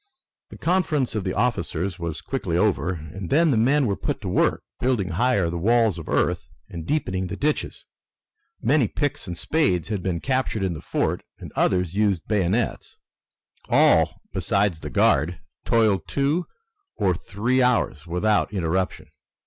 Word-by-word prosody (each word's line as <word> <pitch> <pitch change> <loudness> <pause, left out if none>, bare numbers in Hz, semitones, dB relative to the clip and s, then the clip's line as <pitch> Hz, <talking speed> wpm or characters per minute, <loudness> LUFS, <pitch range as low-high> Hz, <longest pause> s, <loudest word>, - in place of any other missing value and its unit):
The - - -11
conference 160 -7 +1
of 110 -3 -2
the 95 -1 -2
officers 95 -5 -1
was 85 -2 -4
quickly 95 -11 -2
over, 95 -1 +1
and 85 +3 -7
then 160 +2 +4
the - - +2
men 135 +6 +3
were 100 -4 0
put - - -3
to - - -5
work - - +1 0.2
building 120 -7 0
higher 100 0 +2
the 85 +1 -3
walls 110 -1 +3
of 80 - -9
earth 85 -2 0 0.2
and 85 -2 -8
deepening 95 -12 -1
the - - -5
ditches. 150 +1 -2 0.7
Many 140 -5 +3
picks 145 -5 -2
and 85 -1 -5
spades 95 - +1
had 105 -4 -2
been 90 -2 -2
captured 130 -3 -1
in 95 -2 0
the 80 - -7
fort, - - -1 0.2
and - - -10
others 90 -2 +1
used 100 -4 +1
bayonets. 105 +2 -1 0.7
All, - - +4
besides 100 -4 +1
the - - -6
guard, 80 +5 +2 0.3
toiled 110 -4 +3
hard - - -39
two 145 +5 0 0.5
or 95 -2 +2
three 115 +9 -1
hours 120 - +1
without 100 +6 +1
interruption. 90 -4 -1
100 Hz, 160 wpm, -24 LUFS, 85-125 Hz, 0.7 s, then